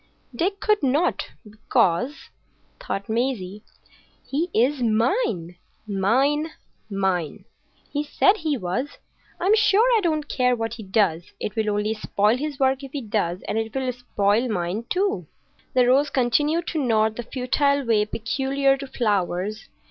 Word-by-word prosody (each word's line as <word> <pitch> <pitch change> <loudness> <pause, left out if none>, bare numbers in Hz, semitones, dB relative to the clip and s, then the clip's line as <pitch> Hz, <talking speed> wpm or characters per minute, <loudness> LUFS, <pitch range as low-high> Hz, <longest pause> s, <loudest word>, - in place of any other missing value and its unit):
Dick 390 +9 -1
could 425 0 +2
not, 290 +6 +1 0.2
"because," 220 - 0 0.5
thought 200 - -4
Maisie, 220 -4 -2 0.7
"he 315 +6 -1
is 260 +3 +2
mine,—mine,—mine. 215 - -1 0.5
He 290 0 0
said 385 +7 +3
he 310 -6 -1
was. 230 +8 -3 0.4
I'm 390 +5 +4
sure 440 0 +4
I - - +4
don't 310 -5 0
care 250 -1 +2
what 225 -1 -3
he 235 - -8
does. 190 -4 +1
It 210 - -4
will 220 -1 0
only 210 +1 0
spoil 210 0 +1
his 295 +1 -4
work 265 0 +2
if 275 - -9
he 285 - -3
does; 200 -6 -2
and 220 - -1
it 225 +1 -4
will 260 -1 -1
spoil 230 -1 0
mine 185 +3 -2
too." 365 - 0 0.5
The 250 -1 +5
rose 270 +4 +4
continued 295 +7 +1
to 310 -4 -1
nod 220 -3 +2
in - - -18
the - - -2
futile 280 +2 +1
way 220 -3 +3
peculiar 270 +5 0
to 275 0 -7
flowers. 205 -4 -1
245 Hz, 145 wpm, -24 LUFS, 210-285 Hz, 0.7 s, The